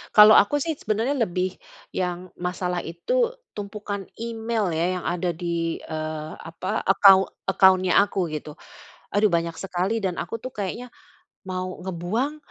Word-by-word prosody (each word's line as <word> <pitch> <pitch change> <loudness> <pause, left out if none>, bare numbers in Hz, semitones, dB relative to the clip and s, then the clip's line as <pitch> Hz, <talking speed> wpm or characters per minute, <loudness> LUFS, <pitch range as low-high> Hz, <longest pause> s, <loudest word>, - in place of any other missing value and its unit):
Kalau 210 0 +10
aku 290 +9 +5
sih 320 +2 -1
sebenarnya 225 +3 -1
lebih, 185 -1 -2 0.4
yang 180 0 -2
masalah 180 0 -2
itu 480 - 0 0.2
tumpukan 205 -1 -5 0.2
email 225 -2 -2
ya, 180 +3 0
yang - - -10
ada 175 0 0
di, 170 0 -2
eee, 155 0 -5
apa, 165 +3 -4
account 195 0 +6 0.2
account-nya 185 -1 +4
aku 195 -3 -1
gitu. 150 -1 -7 0.6
Aduh 205 +1 +4
banyak 170 -1 0
sekali 195 +5 -2
dan 185 -3 -2
aku 230 - -4
tuh 255 - -5
kayaknya, 235 +4 -5 0.5
mau 185 0 -4
ngebuang, 190 - -2
190 Hz, 140 wpm, -24 LUFS, 175-215 Hz, 0.6 s, Kalau